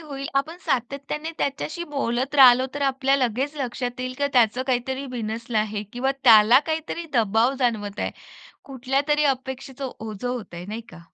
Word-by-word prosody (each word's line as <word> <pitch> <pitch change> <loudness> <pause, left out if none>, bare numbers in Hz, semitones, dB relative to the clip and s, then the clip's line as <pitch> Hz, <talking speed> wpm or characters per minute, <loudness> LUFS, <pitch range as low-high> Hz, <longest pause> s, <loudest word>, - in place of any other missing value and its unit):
होईल 280 -3 -6
आपण 280 +5 0
सातत्याने 280 +5 -2
त्याच्याशी 310 +5 -3
बोलत 275 -3 -2
राहिलो 260 -2 +7
तर 285 - -3
आपल्याला 270 0 +2
लगेच 265 +6 -2
लक्षात 250 -2 -4
येईल, 255 0 -4
की 285 - +2
त्याच 245 -1 +3
काहीतरी 260 +1 -1
बिनसल 230 +1 -5
आहे 215 -1 0
किंवा 265 +3 0
त्याला 225 +1 +8
काहीतरी 320 +1 -3
दबाव 225 +3 +3
जाणवत 215 -5 -1
आहे. - - -1 0.5
कुठल्यातरी 275 +3 0
अपेक्षेच 265 +1 -9
ओझं 225 -3 -5
होतय 200 -8 -5
नाही 220 +2 -4
का. 170 - -12
255 Hz, 150 wpm, -24 LUFS, 235-275 Hz, 0.5 s, त्याला